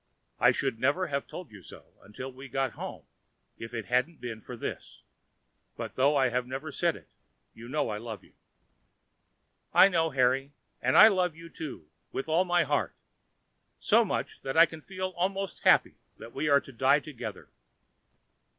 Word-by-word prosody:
I - - +6
should 115 - -2
never 145 +9 +1
have 140 - -1
told 180 - -9
you 105 -3 -12
so - - -15
until 125 +6 -8
we 135 +2 -11
had 135 - -12
got 135 -1 0
home - - -8 0.5
if 115 - -7
it 115 -3 -5
hadn't 130 +6 0
been 115 -3 -6
for - - -9
this; - - -7 0.7
but - - -6
though 140 +3 +3
I 130 -2 +3
have 125 +1 -1
never 135 +4 -5
said 170 +2 +1
it, 80 - -15 0.4
you 115 +2 -11
know 145 -2 0
I 105 - -4
love 110 -2 -7
you." - - -22 1.4
"I 195 - +8
know, 165 -3 +1
Harry; 135 +1 +1 0.3
and 130 +1 +2
I 215 - +11
love 180 -6 +1
you 165 0 -12
too 145 - -8 0.2
with 135 - -4
all 165 +4 +2
my 175 -1 +3
heart—so 145 -1 -2
much, - - -3
that 135 +2 -4
I 165 - +9
can 160 -2 -11
feel 185 +2 -4
almost 195 +2 -2
happy - - +4 0.2
that 115 - -11
we 155 - -1
are 140 -1 +5
to - - -13
die 135 +4 +3
together." 145 -4 -8
140 Hz, 180 wpm, -29 LUFS, 125-165 Hz, 1.4 s, I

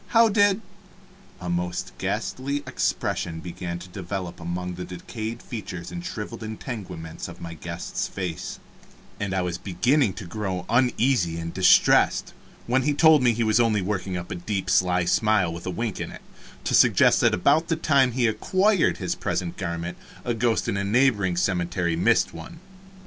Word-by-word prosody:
How 230 0 +7
did 205 0 +3 0.4
" - - -26 0.3
A 90 - -7
most 85 0 -2
ghastly 140 +2 -2
expression 80 -2 -2
began 85 0 -5
to 90 +1 -10
develop 90 -1 -5
among 90 +1 -4
the 90 +1 -6
decayed 110 +6 -6
features 95 -7 -6
and 175 - -6
shriveled 115 - -6
integuments 105 - -6
of 90 0 -10
my 85 -1 -7
guest's 85 +1 -4
face, 90 -4 -5 0.6
and 100 -2 -2
I 95 -1 0
was 90 -1 -3
beginning 110 - +2
to 105 - -8
grow 95 -1 -4
uneasy 120 -7 +2
and 85 0 -5
distressed, 95 -1 +4 0.3
when 130 +2 +2
he 145 +2 +1
told 160 -2 +6
me 125 -1 +4
he 115 +1 0
was 110 +1 +3
only 110 -4 +2
working 95 -1 -2
up 90 0 -7
a - - -2
deep, 95 +1 -3
sly 90 -1 +3
smile, 95 -2 +2
with 85 +2 -7
a - - 0
wink 105 +3 -3
in - - -4
it, - - -10 0.4
to - - -2
suggest - - +5
that - - +4
about 145 - +3
the 165 - +1
time 140 -5 +3
he 125 -1 +1
acquired 185 - +2
his - - -2
present 85 -2 -3
garment 85 +1 -4 0.3
a 120 - 0
ghost 115 0 +1
in 100 - 0
a 100 - -1
neighboring 100 -5 +2
cemetery 90 -2 0
missed 110 +7 +2
one. 165 - -10
100 Hz, 175 wpm, -25 LUFS, 90-120 Hz, 0.6 s, How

